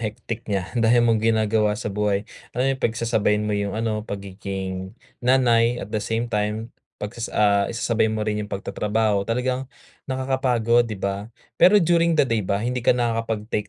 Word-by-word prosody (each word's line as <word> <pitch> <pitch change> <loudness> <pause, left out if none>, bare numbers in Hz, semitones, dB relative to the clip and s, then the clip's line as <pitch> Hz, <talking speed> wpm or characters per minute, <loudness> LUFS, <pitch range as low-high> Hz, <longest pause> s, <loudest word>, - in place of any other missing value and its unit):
hectic 110 +1 -4
niya, 95 -2 -2
dami 120 0 +3
mong 115 -2 +3
ginagawa 110 -1 +2
sa 110 -3 -4
buhay. 105 0 0 0.3
Ano 125 - +1
yung 135 -1 0
pagsasabayin 110 -2 +1
mo 105 - -1
yung 100 0 -2
ano 110 -1 -1
pagiging 95 -1 -6 0.2
nanay 120 -2 +3
at 105 -3 -7
the 110 - 0
same 115 +2 -2
time 105 +2 -2 0.2
'pag 105 +2 -5
sas 115 -1 -5
ah, 100 -1 +2
isasabay 115 -1 0
mo 110 0 -2
rin 105 0 -1
yung 105 - -5
pagtatrabaho 105 +1 0
talagang 125 +2 -1 0.4
nakakapagod, 125 -3 +1
'di 110 - -4
ba? 100 +2 -3 0.3
Pero 200 +3 +7
during 170 -3 +3
the 150 - +5
day 115 -3 0
ba 100 +1 -1
hindi 125 +4 -2
ka 120 - +3
nakakapag-take 115 -3 -2
110 Hz, 170 wpm, -23 LUFS, 105-120 Hz, 0.4 s, Pero